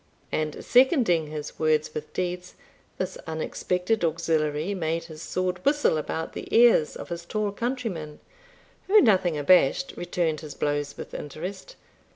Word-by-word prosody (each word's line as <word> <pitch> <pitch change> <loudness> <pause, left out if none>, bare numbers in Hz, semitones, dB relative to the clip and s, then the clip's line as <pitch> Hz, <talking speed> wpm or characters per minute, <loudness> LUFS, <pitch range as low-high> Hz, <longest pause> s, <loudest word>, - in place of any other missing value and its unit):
And 155 -1 -2
seconding 245 - +4
his 150 0 -7
words 155 -1 +1
with 155 0 -6
deeds, 180 0 -4 0.4
this 185 - -4
unexpected 180 +5 -1
auxiliary 160 +1 0
made 165 -3 -1
his 160 -2 -10
sword 180 +1 -2
whistle 290 - +3
about 160 +1 -3
the - - -7
ears 230 -9 +5
of - - -8
his 170 0 -5
tall 210 +3 -2
countryman, 205 - -4 0.7
who, 425 +3 +7
nothing 185 - +3
abashed, 145 -3 +3
returned 170 -3 -1
his 150 -3 -9
blows 145 -1 -2
with - - -8
interest. 180 - -7
170 Hz, 140 wpm, -26 LUFS, 155-195 Hz, 0.7 s, who